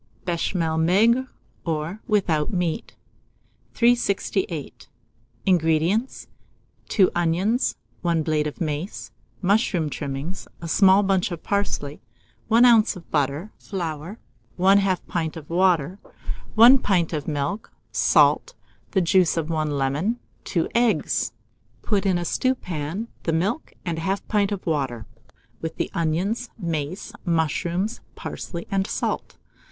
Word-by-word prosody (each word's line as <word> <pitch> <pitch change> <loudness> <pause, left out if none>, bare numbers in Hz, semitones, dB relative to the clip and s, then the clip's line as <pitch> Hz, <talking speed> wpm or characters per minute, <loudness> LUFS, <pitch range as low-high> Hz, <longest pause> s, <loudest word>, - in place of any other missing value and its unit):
BECHAMEL 170 -2 0
MAIGRE, 225 +10 +4 0.4
or 165 +5 -3
WITHOUT 170 -8 +1
MEAT. 180 +1 -2 0.8
368. 200 - 0 0.6
INGREDIENTS. 175 +6 +1 0.6
2 195 -4 +4
onions, 175 +8 +1 0.3
1 170 -2 +1
blade 155 -1 +1
of 150 - -7
mace, 155 +3 -4 0.3
mushroom 185 -5 +2
trimmings, 140 +6 -5
a 170 - -6
small 195 +4 +5
bunch 195 -2 +1
of 170 -2 -6
parsley, 200 -8 -2 0.5
1 230 +2 +6
oz. 230 -3 +5
of 180 - -13
butter, 145 +7 0
flour, 170 0 -5 0.4
1/2 190 0 +3
pint 165 -2 -2
of 150 -2 -9
water, 180 -1 +2 0.6
1 240 +5 +8
pint 180 -8 +1
of 150 -2 -3
milk, 150 +7 -2 0.2
salt, - - +3 0.4
the 190 - +3
juice 175 -1 +3
of 165 0 -1
1 155 -1 0
lemon, 145 - 0 0.3
2 170 -4 0
eggs. 235 -1 +1
Mode. - - -39
Put 205 -2 +1
in 185 -2 +3
a 175 - -3
stewpan 185 - -2
the 165 - -1
milk, 200 - -1
and 165 -2 -2
1/2 195 +4 -1
pint 205 -2 +1
of 200 -2 -4
water, 135 -8 -1 0.6
with 160 0 -4
the - - -2
onions, 185 +9 -1
mace, 170 +3 -4
mushrooms, 170 +4 0
parsley, 170 -1 -6
and 195 0 +1
salt. - - -3
175 Hz, 125 wpm, -24 LUFS, 160-200 Hz, 0.8 s, 1